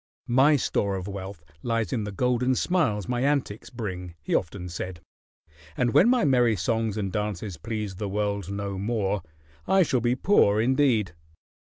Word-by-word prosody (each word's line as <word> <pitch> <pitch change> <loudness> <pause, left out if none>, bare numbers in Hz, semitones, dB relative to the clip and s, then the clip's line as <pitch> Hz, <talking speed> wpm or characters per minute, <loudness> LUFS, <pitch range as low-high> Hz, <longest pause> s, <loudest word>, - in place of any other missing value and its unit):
"My 135 +5 +4
store 100 -6 0
of 95 0 -5
wealth 95 -4 -7 0.2
lies 115 -5 -1
in 110 -3 -1
the 105 - -5
golden 125 +4 +1
smiles 125 - 0
my 120 -1 -1
antics 135 -6 -1
bring," 90 -7 -6
he - - -3
often 90 0 -1
said, 90 0 -6 0.8
"and 120 -2 +1
when 220 - +6
my 250 -8 +3
merry 125 -5 +3
songs 110 +3 -1
and 100 -3 -2
dances 105 -3 -3
please 105 -3 -4
the 105 -1 -3
world 100 -2 -2
no 100 -1 -4
more, 105 -2 -1 0.5
I 190 -1 +5
shall 130 -6 0
be 120 +1 +1
poor 115 - +3
indeed." 120 - +2
105 Hz, 165 wpm, -26 LUFS, 100-125 Hz, 0.8 s, when